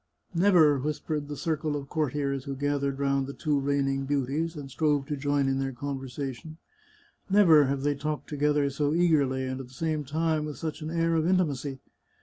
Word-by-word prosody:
" - - -41
Never," 170 -6 +5
whispered 150 +1 -3
the 145 -1 -6
circle 155 -2 -1
of 140 -1 -5
courtiers 140 -3 -1
who 140 - -4
gathered 140 0 -1
round 140 -1 0
the 140 - -7
two 150 -3 0
reigning 135 -1 0
beauties, 145 +4 -1
and 140 -3 -8
strove 145 +1 +1
to 150 +1 -3
join 145 0 0
in 135 0 +1
their 135 0 -1
conversation, 135 +2 -5 0.4
" - - -30 0.3
never 170 -7 +6
have 135 0 -1
they 145 0 +2
talked 150 +1 -4
together 150 -1 +1
so 145 +2 0
eagerly, 145 -7 +2
and 130 0 -4
at 130 - -10
the 125 - -18
same 155 +2 -1
time 155 +2 0
with 150 -1 -6
such 160 -1 -5
an 155 - -4
air 165 0 +1
of 160 0 +2
intimacy. 145 -7 0
145 Hz, 195 wpm, -28 LUFS, 135-155 Hz, 0.4 s, never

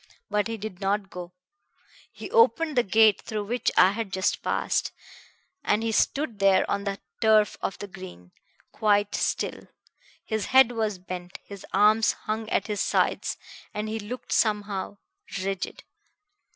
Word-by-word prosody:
But 210 +1 +1
he 225 0 -4
did 210 -3 -7
not 200 0 -1
go. 180 0 -8 0.8
He - - -9
opened 330 - +4
the 245 - +5
gate 220 0 +4
through 215 -1 -4
which 240 +4 0
I 185 - +7
had 215 -1 -4
just 190 0 0
passed, - - 0 0.7
and 210 +2 +1
he 225 - 0
stood 235 0 0
there 195 -1 +4
on 200 0 -2
the 195 0 -3 0.2
turf 215 -2 +4
of - - -3
the - - -6
green, 185 - -11 0.4
quite 205 -1 +2
still. - - -2 0.6
His 220 -1 -2
head 260 -2 +6
was 220 -4 -1
bent, 180 0 -7
his 200 -2 -10
arms 210 +2 +4
hung 220 0 -4
at - - +1
his 210 -2 -2
sides, - - 0 0.4
and 210 +1 -2
he 220 +1 -3
looked 220 +5 -7
somehow... 205 -2 0 0.5
rigid. 195 -1 -4
210 Hz, 150 wpm, -26 LUFS, 195-220 Hz, 0.8 s, I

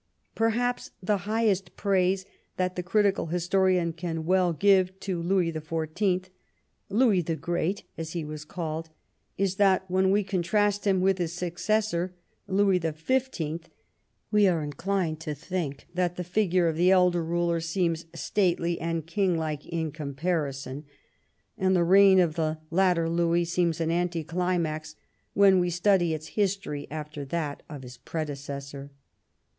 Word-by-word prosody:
Perhaps 240 +2 0
the 205 +3 +2
highest 205 -5 +1
praise 190 -1 +1 0.3
that 185 0 -1
the 180 - -2
critical 195 +1 +1
historian 180 0 +1
can 165 -1 -4
well 185 0 +3
give 190 +2 +3
to 185 -3 -2
Louis 175 -1 +1
the 160 -1 -5
Fourteenth 180 +4 -1 0.3
— - - -47
Louis 220 -8 +4
the 165 0 -2
Great, 175 +5 -2 0.2
as 160 -1 -5
he 170 -3 -3
was 150 0 -6
called 160 0 -5 0.3
— - - -47
is 190 0 -2
that 190 -2 +3
when 190 +1 +3
we 205 +2 +3
contrast 205 +2 0
him 190 -2 +3
with 190 0 +2
his 170 -1 -2
successor, 180 +1 -1 0.3
Louis 195 -1 +3
the 165 -2 -2
Fifteenth, 165 - -2 0.6
we 210 -2 +5
are 170 -4 +1
inclined 160 +2 -2
to 155 -2 -4
think 155 -2 -4
that 175 -1 0
the 180 - -4
figure 180 -1 +1
of 160 -1 -1
the 175 +2 +4
elder 180 -2 +4
ruler 170 0 0
seems 165 0 -1
stately 175 -4 0
and 165 -1 -2
king 185 0 +1
like 155 -2 -3
in 160 -2 -2
comparison, 145 -2 -3 0.8
and 190 0 +3
the 175 - +3
reign 190 +2 +6
of 170 -4 +3
the 155 -1 -1
latter 175 -2 +3
Louis 170 +1 +1
seems 170 -1 0
an 165 0 0
anticlimax 170 -2 -1 0.4
when 195 -2 +6
we 175 0 +1
study 175 -1 +2
its 155 0 -8
history 195 -8 -2
after 150 -1 -6
that 150 0 -3
of 145 -4 -8
his 125 -1 -10
predecessor. 140 -1 -6
175 Hz, 150 wpm, -27 LUFS, 160-190 Hz, 0.8 s, reign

